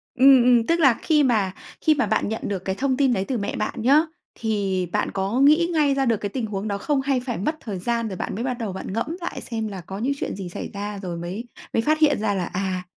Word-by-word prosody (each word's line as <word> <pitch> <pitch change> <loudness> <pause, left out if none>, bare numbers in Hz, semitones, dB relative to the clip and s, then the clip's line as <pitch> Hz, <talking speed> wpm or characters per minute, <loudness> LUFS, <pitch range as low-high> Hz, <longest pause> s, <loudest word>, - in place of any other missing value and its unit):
Ừm, 265 -1 +7
ừm. 240 -2 +4
Tức 335 +1 +2
là 270 -6 +6
khi 305 -3 +3
mà 215 -7 +2 0.3
khi 310 - +4
mà 260 - +1
bạn 210 0 0
nhận 220 - -3
được 200 -2 -2
cái 190 - -1
thông 260 +2 0
tin 270 -3 +3
đấy 190 -3 -1
từ 255 - -1
mẹ 200 - -3
bạn 215 - -3
nhá, 275 +6 +5 0.4
thì 200 -5 0
bạn - - 0
có 195 +5 -1
nghĩ 310 +4 +5
ngay 295 -3 +3
ra 270 -1 +1
được 230 -3 +2
cái 205 - -4
tình 245 +1 -3
huống 210 0 -4
đó 200 - -1
không? 280 +6 0
Hay 270 -1 +1
phải 245 -2 -4
mất 305 - -1
thời 200 -6 -5
gian 235 +3 -1
rồi 190 -4 -5
bạn - - -4
mới 230 - -3
bắt 255 - -1
đầu 215 -5 -3
bạn 190 0 -6
ngẫm 300 +10 -2
lại 345 - -4
xem 225 -2 -4
là 195 -3 -6
có 195 +5 -7
những 265 +5 0
chuyện - - -3
gì 190 -3 -6
xảy - - -6
ra, 205 0 -5
rồi 175 -3 -4
mới 185 +8 -5 0.3
mới 225 - +2
phát 310 +4 +1
hiện 295 -3 +4
ra 210 -1 0
là, 185 -3 -1
à, 185 0 -3
225 Hz, 280 wpm, -23 LUFS, 195-270 Hz, 0.4 s, Ừm